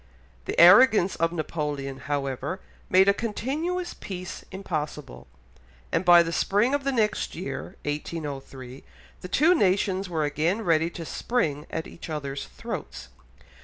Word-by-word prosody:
The -, -, -2 dB
arrogance 195 Hz, +1 st, +7 dB
of 165 Hz, 0 st, +1 dB
Napoleon, 150 Hz, -4 st, -3 dB
however, 140 Hz, +4 st, -3 dB, 0.3 s
made 190 Hz, +1 st, +5 dB
a 200 Hz, -, +6 dB
continuous 300 Hz, -, -3 dB
peace 185 Hz, -2 st, -7 dB
impossible, 150 Hz, -, -5 dB, 0.6 s
and -, -, +1 dB
by 175 Hz, -2 st, +7 dB
the 165 Hz, -, -4 dB
spring 210 Hz, +10 st, +2 dB
of 285 Hz, -1 st, 0 dB
the 275 Hz, -, 0 dB
next 215 Hz, -5 st, 0 dB
year 135 Hz, -5 st, -6 dB
(1803) 140 Hz, -4 st, -6 dB, 0.4 s
the -, -, -6 dB
two 310 Hz, -, +4 dB
nations 195 Hz, -, +1 dB
were 160 Hz, -3 st, -1 dB
again 160 Hz, +9 st, 0 dB
ready 165 Hz, -2 st, +2 dB
to 170 Hz, -1 st, -8 dB
spring 155 Hz, -9 st, -1 dB
at 160 Hz, -, -4 dB
each 170 Hz, -, -10 dB
other's 140 Hz, -, -4 dB
throats. -, -, -7 dB
170 Hz, 135 wpm, -26 LUFS, 145-200 Hz, 0.6 s, arrogance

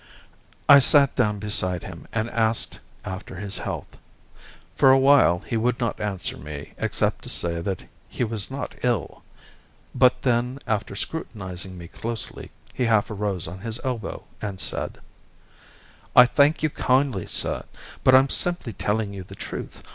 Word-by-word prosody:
I 140 Hz, -1 st, +10 dB
sat 140 Hz, +1 st, +5 dB
down 105 Hz, -5 st, +1 dB
beside 95 Hz, -3 st, +3 dB
him 85 Hz, -3 st, -10 dB
and 110 Hz, 0 st, -1 dB
asked 110 Hz, -1 st, 0 dB, 0.3 s
after 95 Hz, 0 st, -7 dB
his 100 Hz, +2 st, -5 dB
health. -, -, -6 dB, 0.8 s
For 135 Hz, -, +5 dB
a 130 Hz, -, +7 dB
while 135 Hz, -10 st, +4 dB
he -, -, -3 dB
would 120 Hz, +2 st, 0 dB
not 115 Hz, -3 st, -2 dB
answer 100 Hz, -5 st, -3 dB
me 75 Hz, -1 st, -9 dB
except -, -, 0 dB
to -, -, -2 dB
say 85 Hz, -1 st, +1 dB
that 95 Hz, 0 st, -4 dB, 0.3 s
he -, -, -2 dB
was 110 Hz, -3 st, -2 dB
not 135 Hz, +1 st, -5 dB
ill; 120 Hz, -6 st, -1 dB, 0.7 s
but 125 Hz, 0 st, +3 dB
then, 125 Hz, +1 st, +1 dB
after 105 Hz, -3 st, -2 dB
scrutinising 95 Hz, -, -5 dB
me 85 Hz, -1 st, -9 dB
closely, 115 Hz, +5 st, -4 dB, 0.2 s
he 125 Hz, -, -1 dB
half 110 Hz, -1 st, +2 dB
arose 100 Hz, -4 st, -2 dB
on 90 Hz, +3 st, -8 dB
his 115 Hz, +3 st, -3 dB
elbow 125 Hz, -5 st, -4 dB, 0.2 s
and 100 Hz, -3 st, -5 dB
said: -, -, -2 dB, 1.2 s
"I 125 Hz, -, +10 dB
thank 145 Hz, +5 st, +2 dB
you 155 Hz, -, +1 dB
kindly, 130 Hz, -9 st, +1 dB
sir, -, -, +2 dB, 0.4 s
but 130 Hz, -, +6 dB
I'm 135 Hz, +1 st, +5 dB
simply 175 Hz, -9 st, 0 dB
telling 105 Hz, +1 st, -2 dB
you 100 Hz, -, -7 dB
the 90 Hz, -, -11 dB
truth. -, -, -7 dB
110 Hz, 155 wpm, -24 LUFS, 95-125 Hz, 1.2 s, I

